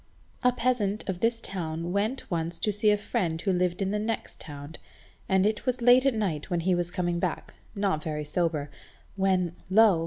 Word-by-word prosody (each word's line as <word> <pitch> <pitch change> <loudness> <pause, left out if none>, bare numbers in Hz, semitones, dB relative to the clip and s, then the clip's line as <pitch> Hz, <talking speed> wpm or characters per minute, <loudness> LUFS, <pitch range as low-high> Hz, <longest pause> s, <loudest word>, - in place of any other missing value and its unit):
A 250 - +5
peasant 230 -4 0
of 185 -3 -2
this 230 +3 +1
town 170 -5 -4
went 210 +7 -1
once 170 0 -1
to 210 - +1
see 210 +1 +2
a 210 - +4
friend 190 -6 -1
who 195 +3 0
lived 180 +1 +1
in 195 - -1
the 210 - 0
next 220 +1 -3
town, 145 +1 -8 0.5
and 190 0 +4
it 215 +5 -1
was 255 0 +1
late 250 +2 +6
at 265 - +2
night 185 -9 -2
when 175 -2 0
he 185 +2 +2
was 175 -1 0
coming 175 -2 -1
back, 175 -3 -3 0.2
not 195 -6 0
very 150 -1 -3
sober, 155 -3 -1 0.4
when, 185 -3 +1
lo! 205 -3 +6
190 Hz, 195 wpm, -28 LUFS, 170-215 Hz, 0.5 s, late